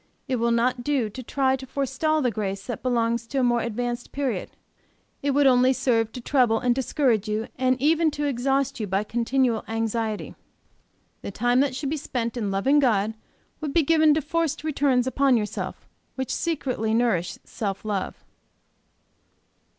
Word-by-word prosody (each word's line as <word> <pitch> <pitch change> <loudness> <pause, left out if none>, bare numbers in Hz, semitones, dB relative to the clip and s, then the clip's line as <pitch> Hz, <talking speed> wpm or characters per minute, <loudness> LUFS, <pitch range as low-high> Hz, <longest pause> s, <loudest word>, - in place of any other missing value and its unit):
It 255 - 0
will 235 0 +1
not 245 +1 +1
do 255 -6 0
to 255 - -7
try 265 +1 +1
to 265 0 -9
forestall 280 +3 0
the 250 - +2
grace 195 -2 -3
that 240 - -5
belongs 235 -2 0
to 275 - -4
a 265 - +3
more 240 -1 +2
advanced 240 +1 -3
period. 275 -3 -2 0.7
It 285 - -1
would 280 +1 +3
only 255 0 +5
serve 225 -4 +1
to 250 - -6
trouble 245 -3 +3
and 245 +1 +2
discourage 245 -4 +1
you, 215 +1 -2
and 255 0 +1
even 315 +4 +3
to 295 - -1
exhaust 270 0 0
you 215 - -2
by 195 +2 0
continual 240 +1 0
anxiety; 225 -1 -2 0.9
the - - -5
time 245 +5 +1
that 270 -2 +1
should 275 +1 -3
be 315 - -1
spent 245 -5 -3
in 220 -5 -2
loving 230 +10 +3
God 220 -5 +2 0.5
would 300 -3 -4
be 335 - +5
given 310 0 +4
to 310 - 0
forced 330 -1 -1
returns 275 -5 +2
upon 265 -1 +3
yourself, 210 -2 -4 0.3
which 265 -1 -3
secretly 255 -9 -1
nourish 225 -8 +1
self 200 -3 -4
love. 200 -3 -3
250 Hz, 170 wpm, -25 LUFS, 225-275 Hz, 0.9 s, only